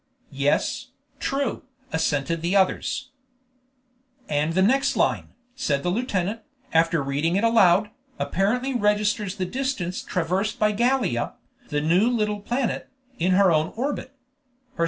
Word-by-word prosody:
"Yes, - - 0 0.3
true," 275 -2 -1 0.3
assented 160 0 0
the 175 +4 0
others. 200 +7 +1 1.2
"And 150 +2 0
the 190 - +4
next 270 +7 +2
line," - - 0 0.2
said 150 - -1
the 175 - 0
lieutenant, 210 -1 -1 0.3
after 165 -1 +3
reading 145 +5 0
it 200 - +1
aloud, 210 -3 +4 0.3
"apparently 245 +8 0
registers 210 -3 +1
the 190 -3 -2
distance 200 -5 -2
traversed 185 +5 -1
by 215 0 +3
Gallia, 235 - 0 0.3
the 150 -1 0
new 175 +9 +3
little 210 -3 0
planet, 240 +4 -2 0.3
in 180 +3 +2
her 190 -1 +5
own 155 0 +1
orbit. 275 +2 -3
200 Hz, 125 wpm, -24 LUFS, 165-235 Hz, 1.2 s, her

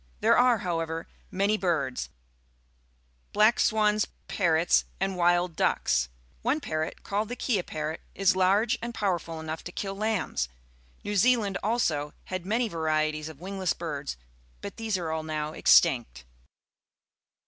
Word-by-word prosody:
There - - +4
are, 245 -1 +5
however, 165 -4 -3 0.2
many 200 +3 +1
birds 165 -10 -1 0.6
— - - -40
black 215 +3 +5
swajis^ 215 -1 +3 0.2
parrotSjjmd 175 +2 +1
wild 175 -1 +2
ducks. 60 - +1 0.3
One 260 +7 +1
parrot, 155 - -3
called 205 +2 -2
the 245 - -3
kea 230 -6 0
parrot, 155 -1 -4
is 195 -1 +3
large 200 +6 +3
and 235 0 -5
powerful 170 -5 -1
enough 160 0 -5
to 175 - -6
kill 195 +2 -4
lambs. 200 - -1 0.5
New 205 - -3
Zealand, 210 -2 +3
also, 165 -10 0
had 185 -1 -5
many 230 +3 +1
varieties 155 -3 -1
of 155 - -11
wmgless 190 +1 -2
birds, 150 - -4 0.4
but - - -8
these 220 -3 -1
are 165 -3 -3
all 160 0 -1
now 155 -1 -3
extinct. 120 - +3
175 Hz, 135 wpm, -28 LUFS, 155-210 Hz, 0.6 s, are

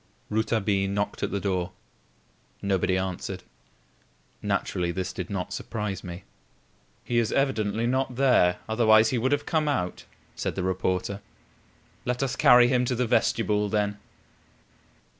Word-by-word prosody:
Rouletabille 105 -3 +1
knocked 100 +1 -2
at - - 0
the 100 - -2
door. 95 -2 -2 0.9
Nobody 95 -1 +1
answered. 95 -1 -4 1.0
Naturally, 90 -1 -1
this 95 +1 -3
did 90 -1 -5
not 100 -3 -3
surprise 105 -4 -4
me. 90 +1 -7 0.8
"He 120 -1 +1
is 115 - 0
evidently 115 -5 0
not 130 +1 0
there, 120 -9 +4
otherwise 110 0 +5
he 125 - +1
would 130 +4 0
have 145 0 +1
come 155 -2 +1
out," 90 -11 -2 0.3
said - - -3
the 95 - -2
reporter. 95 +2 -1 0.8
"Let 125 +2 -1
us 130 -2 -1
carry 125 -4 +7
him 125 0 +2
to 125 - 0
the 125 +1 0
vestibule 105 -2 +1
then." 105 0 0
105 Hz, 140 wpm, -26 LUFS, 95-125 Hz, 1.0 s, carry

